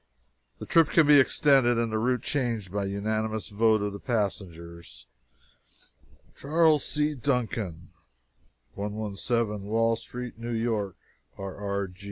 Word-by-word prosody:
The - - -8
trip 165 -3 +4
can 165 - +4
be 145 0 +7
extended, 130 -3 +4
and 115 -1 0
the 110 - 0
route 125 +2 0
changed, 115 -9 -2
by 100 0 -2
unanimous 110 +2 -2
vote 110 0 +2
of 105 -1 -2
the 100 - -7
passengers. 85 - -4 1.3
CHAS. 155 0 +3
C. 150 0 0
DUNCAN, 115 - -2 0.8
117 105 +1 -2
WALL 115 +1 +2
STREET, 120 +1 -8
NEW 120 +1 -4
YORK 110 -5 -1 0.4
R. 95 -1 -6
R. 100 -1 -3
110 Hz, 125 wpm, -27 LUFS, 100-125 Hz, 1.3 s, be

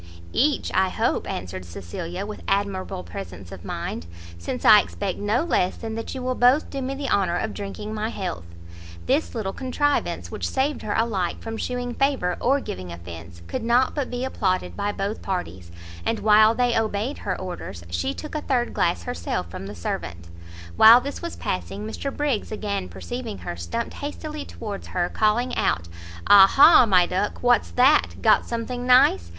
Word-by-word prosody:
"Each, 290 +2 +1
I 190 0 +3
hope," - - -1
answered 90 +1 -5
Cecilia, 165 - -6
with 210 0 -7
admirable 195 - -1
presence 90 +1 -9
of 95 -3 -9
mind, 80 - -5 0.3
"since 85 - -5
I - - +9
expect 85 0 -4
no 210 +7 +1
less 185 - +1
than 225 -1 -5
that 225 +4 -5
you 260 - -5
will 255 0 0
both 255 +5 +3
do 275 - -4
me 265 +1 -3
the 275 0 -4
honour 185 -7 +1
of 215 +3 -2
drinking 210 +1 -6
my 215 +1 -2
health." 180 - -5 0.6
This 280 +1 0
little 200 -4 -2
contrivance, 285 +2 -1
which - - -3
saved 275 +2 0
her 205 - -2
alike 200 -6 0
from 225 0 -5
shewing 245 +1 -3
favour 260 -10 +1
or 275 +3 +2
giving 90 - -6
offence, 85 0 -10
could 260 - -4
not 240 +3 +2
but 285 -4 -2
be 245 +1 -3
applauded 190 -8 -1
by 205 0 -1
both 205 +2 -3
parties; 95 - -4 0.3
and 225 - 0
while 215 +1 +5
they 245 -1 +2
obeyed 225 +4 -1
her - - -3
orders, 180 - -7
she 85 0 -1
took 305 - -8
a 305 - -2
third 245 -4 0
glass 85 - 0
herself 85 +1 -3
from 95 - -7
the 105 - -8
servant. 85 0 -5 0.5
While 230 +2 +9
this 280 +3 -6
was 340 -1 -5
passing, 200 +3 -4
Mr 275 +5 -4
Briggs, 280 -9 -1
again 200 -3 -3
perceiving 240 -4 -6
her, - - -6
stumpt 85 - -4
hastily 300 +1 -6
towards 205 -3 -7
her, 175 -1 -1
calling 230 +4 +1
out 85 +1 0 0.4
"Ah 195 -1 +9
ha! 275 +1 +7
my 180 -3 +5
duck! 185 +6 -2
what's 245 0 +3
that? 265 +5 +4
got - - +4
something 245 +1 -4
nice? 95 - +5
215 Hz, 180 wpm, -24 LUFS, 175-250 Hz, 0.6 s, I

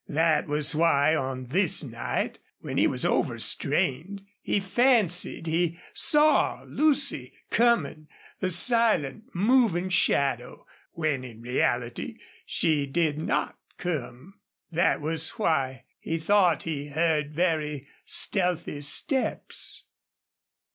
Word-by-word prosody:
That 155 0 +1
was 150 +1 0
why, 155 -1 +3
on 130 -3 -3
this 170 +7 +3
night 120 -4 -4 0.2
when - - -3
he - - +4
was - - -2
overstrained, 190 +9 0 0.2
he - - 0
fancied 195 -5 +1
he 165 +1 -1 0.2
saw 300 0 +3
Lucy 280 - 0 0.2
coming, 230 -10 +1 0.3
a 185 - 0
silent, 215 - +2
moving 200 -3 +2
shadow, 135 -8 0 0.3
when 155 -5 -2
in 115 -2 -11
reality 120 -1 -2 0.3
she 150 -3 +1
did 155 0 -1
not 160 - -2 0.2
come. 160 +2 -6 0.3
That 170 -1 +1
was 160 +1 -1
why 135 - -1 0.2
he 165 - -3
thought 175 -1 +2
he 145 -3 -4
heard 150 -1 -1
very 155 -5 -1 0.2
stealthy 180 -6 0
steps. 260 - 0
160 Hz, 105 wpm, -26 LUFS, 145-185 Hz, 0.3 s, he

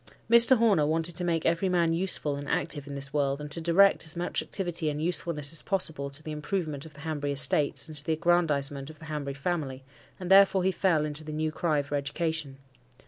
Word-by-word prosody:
Mr. 235 +3 +6
Horner 200 -10 +3
wanted 165 +2 -1
to 180 - -4
make 165 -2 -1
every 170 +3 +1
man 170 -2 +1
useful 165 -4 +2
and 140 0 -7
active 145 -2 -3
in 140 - -7
this 135 0 -3
world, 140 -1 0
and 150 0 -8
to 165 - +3
direct 180 +4 +4
as 160 +1 -5
much 175 +1 -2
activity 175 -5 -3
and 150 0 -4
usefulness 160 -3 -1
as 165 - -2
possible 160 -7 -1
to 145 +3 -13
the 155 - -6
improvement 150 -1 -4
of 150 - -17
the 140 - -13
Hanbury 145 -2 -3
estates, 145 +2 +2
and 155 - -10
the 150 +3 +1
aggrandisement 150 -4 0
of 155 - -12
the 165 - -13
Hanbury 145 -3 -5
family, 140 -3 -4 0.4
and 180 0 -5
therefore 195 -1 +6
he 190 - +2
fell 170 -4 +1
into 150 +1 0
the 155 - -8
new 155 +1 -2
cry 155 -3 -1
for 140 - -9
education. 145 0 -3
155 Hz, 215 wpm, -27 LUFS, 145-175 Hz, 0.4 s, Mr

